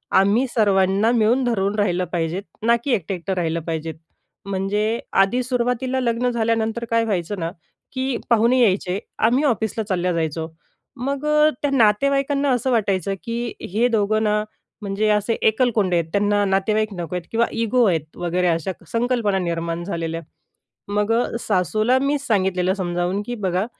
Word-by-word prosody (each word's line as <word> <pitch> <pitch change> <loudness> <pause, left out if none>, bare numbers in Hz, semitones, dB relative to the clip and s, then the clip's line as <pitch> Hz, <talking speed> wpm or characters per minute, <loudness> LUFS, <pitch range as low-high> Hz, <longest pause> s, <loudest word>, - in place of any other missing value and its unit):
आम्ही 200 +7 +4
सर्वांना 200 -1 +2
मिळून 240 +2 +3
धरून 205 -4 0
राहिलं 180 -3 +1
पाहिजे 170 +1 -1 0.2
ना, 235 +1 +5
की 280 - -1
एकटं-एकटं 190 -1 -2
राहिलं 170 -2 -1
पाहिजे. 160 0 -4 0.5
म्हणजे 205 +4 -1 0.2
आधी 195 +6 +2
सुरुवातीला 250 +1 -1
लग्न 240 0 0
झाल्यानंतर 230 0 0
काय 230 0 +3
व्हायचं 200 -2 -2
ना, 165 0 -2 0.4
की 260 -1 -1
पाहुणे 235 +2 +4
यायचे, 190 -3 +2 0.2
आम्ही 245 +6 +2
ऑफिसला 220 -4 0
चालल्या 180 -1 0
जायचो. 160 -1 -2 0.5
मग 275 +3 -3 0.4
त्या 290 - +1
नातेवाईकांना 275 +4 +2
असं 255 +1 0
वाटायचं, 195 -5 +1
की 235 0 -3 0.2
हे 230 +5 +2
दोघं 215 -1 +1
ना, 210 0 +1 0.4
म्हणजे 205 +1 -1
असे 210 +2 +2
एकलकोंडे 220 -5 +2
आहेत, 165 -1 -1
त्यांना 205 +1 +2
नातेवाईक 210 +2 +1
नको 175 -1 -5
आहेत 180 -2 -4
किंवा 230 +1 +2
इगो 230 +2 +1
आहेत, 160 -4 +1
वगैरे 175 +1 0
अशा 165 +2 0 0.2
संकल्पना 230 -4 +1
निर्माण 170 -1 -2
झालेल्या. 165 -2 -3 0.7
मग 205 +1 0
अ, 235 +2 +2
सासूला 215 - +1
मी 280 +1 +1
सांगितलेलं, 190 -7 +1
समजावून, 180 0 -1
की 245 - -4
बघा, 190 -2 -1
210 Hz, 150 wpm, -21 LUFS, 185-235 Hz, 0.7 s, ना